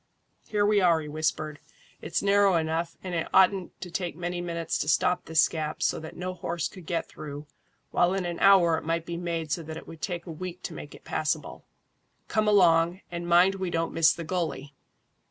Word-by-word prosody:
"Here 210 -1 +1
we 205 -1 +4
are," 170 -3 +4
he 150 - -7
whispered. 155 0 -2 0.4
"It's 170 - -2
narrow 200 -1 +4
enough, 165 +1 -1
and 185 -1 -5
it 165 -2 -1
oughtn't 190 -1 +3
to 180 - -7
take 175 -1 -3
many 175 +1 -3
minutes 170 -1 -2
to - - -2
stop 180 +3 +2
this 160 -1 +4
gap 155 -1 -4
so - - +1
that 160 0 -9
no 185 +1 -3
horse 170 -2 -3
could 185 -5 -13
get 170 -2 -1
through, 145 0 -8 0.5
while 175 +2 +3
in 190 -2 -1
an 175 -1 -4
hour 175 -5 +5
it - - -13
might 165 +1 -1
be 170 - -4
made 170 -3 -3
so 165 - 0
that 160 0 -7
it - - -10
would 165 -2 -11
take 175 -2 -3
a 170 - -7
week 180 +2 -7
to - - -5
make - - -9
it - - -16
passable. - - -3 0.6
Come 215 -1 +1
along, 175 -3 +4
and 170 0 -4
mind 175 +3 +5
we 185 - -1
don't 165 -1 -1
miss 165 -1 +5
the 170 - -4
gully." 155 -5 -3
170 Hz, 210 wpm, -27 LUFS, 160-180 Hz, 0.6 s, hour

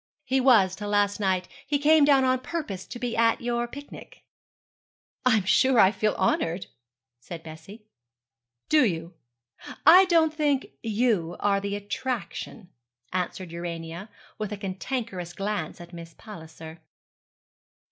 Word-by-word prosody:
'He 265 0 +1
was 220 -8 +5
till 205 +1 -6
last 205 0 +1
night. 185 -3 0 0.2
He 290 +1 +1
came 300 +1 +5
down 275 -2 +5
on 255 0 +2
purpose 255 - -5
to 240 - -7
be 240 -1 -3
at 230 0 +3
your 240 0 -2
picnic.' 285 +4 -12 1.0
'I 235 -3 +5
am 205 - -1
sure 250 +6 +4
I 190 - +7
feel 215 0 0
honoured,' 180 -1 0 0.5
said 165 +6 -9
Bessie. 165 +7 -12 0.8
'Do 305 -1 +4
you? 170 -5 -2 0.7
I 360 +5 +9
don't 330 -3 +3
think 290 -3 0
you 215 -7 0
are 200 -1 +2
the 200 0 -3
attraction,' 205 -2 -5 0.4
answered 185 -1 -3
Urania, 170 +2 -6 0.3
with 215 -1 -4
a 210 - -4
cantankerous 195 -1 -5
glance 195 -6 -4
at 175 0 -12
Miss 165 -1 -10
Palliser. 160 -5 -11
205 Hz, 135 wpm, -26 LUFS, 180-255 Hz, 1.0 s, I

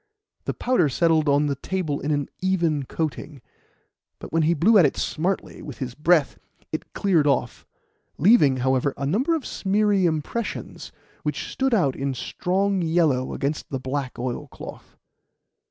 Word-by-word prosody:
The - - -2
powder 245 - +2
settled 160 +1 +2
on 145 +1 +3
the 145 - 0
table 155 -2 -2
in 145 - -3
an 145 -2 0
even 170 -7 0
coating, 150 -1 -4 0.8
but - - -10
when 165 - +3
he 165 +2 +2
blew 200 +8 +5
at 175 - +6
it - - -5
smartly 180 +5 -2
with 140 -6 -8
his 130 -2 -5
breath, 155 +1 +2 0.3
it - - -5
cleared 170 -7 +2
off, 125 -4 -1 0.5
leaving, 150 - +5
however, 130 +1 +1
a 140 - -3
number 245 - +1
of 310 - -4
smeary 200 -1 +1
impressions 165 +9 -4 0.3
which - - -3
stood 265 -2 +1
out 140 -11 +2
in 135 -1 -2
strong 190 +8 -1
yellow 160 -6 +1
against 145 +3 -3
the 135 -4 -3
black 130 0 -4
oilcloth. 125 0 -7
155 Hz, 155 wpm, -24 LUFS, 140-190 Hz, 0.8 s, at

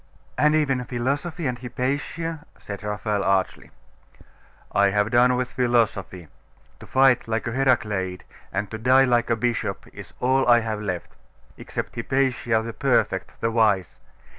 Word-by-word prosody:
'And 150 +1 +3
even 135 -5 +1
philosophy 140 +8 -2
and 125 -2 -2
Hypatia?' 140 +6 -3
said 100 -1 -8
Raphael 105 -1 -2
archly. 95 -1 0 1.0
'I 100 0 +3
have 105 +2 0
done 125 +1 +4
with 125 0 -2
philosophy. 110 -8 0 0.5
To - - -12
fight 130 -3 +3
like 115 0 -2
a 115 - -2
Heracleid, 105 -8 0 0.3
and 95 +1 -3
to 110 - -5
die 130 +3 +5
like 120 -2 +1
a 115 - +3
bishop, 120 +1 -2
is - - -11
all 130 +1 +2
I 120 -1 +6
have 110 -1 -3
left 90 -4 -4 0.4
except - - -6
Hypatia, 120 -2 0
the 115 0 -6
perfect, - - 0
the 115 - 0
wise! 105 -6 +1
120 Hz, 145 wpm, -24 LUFS, 105-130 Hz, 1.0 s, I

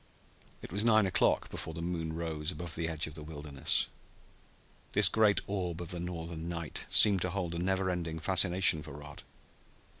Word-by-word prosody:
It - - -8
was 100 +4 +1
nine 110 -2 +5
o'clock 95 - +2
before 80 - -5
the 85 - -5
moon 85 -2 -3
rose 80 -2 -3
above 85 -2 -6
the 85 -1 -1
edge 80 -2 -2
of 80 - -8
the 80 - -9
wilderness. 75 -2 0 1.1
This - - +5
great 110 -2 +3
orb 90 -4 -3
of 85 -2 -6
the 90 - -4
Northern 85 -1 -5
night 85 -2 -4
seemed 100 -4 +6
to 90 - +1
hold 90 -2 -3
a 85 - -3
never 95 +1 0
ending 85 -2 -3
fascination 90 -1 +3
for 75 -1 -10
Rod. 75 +1 -9
85 Hz, 180 wpm, -31 LUFS, 80-95 Hz, 1.1 s, seemed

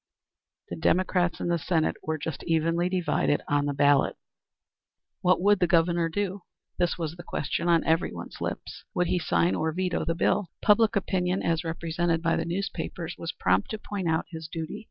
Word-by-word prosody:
The 85 - -4
Democrats 180 - +1
in - - -2
the 170 -1 +1
Senate 160 0 +1
were 160 0 -2
just 160 +1 -5
evenly 165 +2 +1
divided 180 -5 +1
on 145 0 +1
the 145 - 0
ballot. 145 0 +4 1.1
What 180 +1 +3
would 205 +2 +4
the 180 - +3
Governor 170 0 +3
do? 200 +2 -2 0.4
This 175 -1 +1
was 165 -2 -3
the 175 - -9
question 170 +2 -2
on 165 -1 +4
everyone's 160 +2 -1
lips. - - -5
Would 180 - +2
he 180 - +1
sign 85 - +2
or 160 +10 0
veto 180 +2 -1
the 165 - -1
bill? 185 +2 +1
Public 220 +1 +4
opinion 185 -1 0
as 165 0 +1
represented 165 0 -1
by 165 0 +2
the - - -1
newspapers 175 -1 -4
was 165 - -3
prompt 95 -9 +1
to 220 - -3
point 200 -3 -4
out 160 0 +1
his 160 -2 -7
duty. 160 -1 -5
170 Hz, 180 wpm, -27 LUFS, 160-180 Hz, 1.1 s, ballot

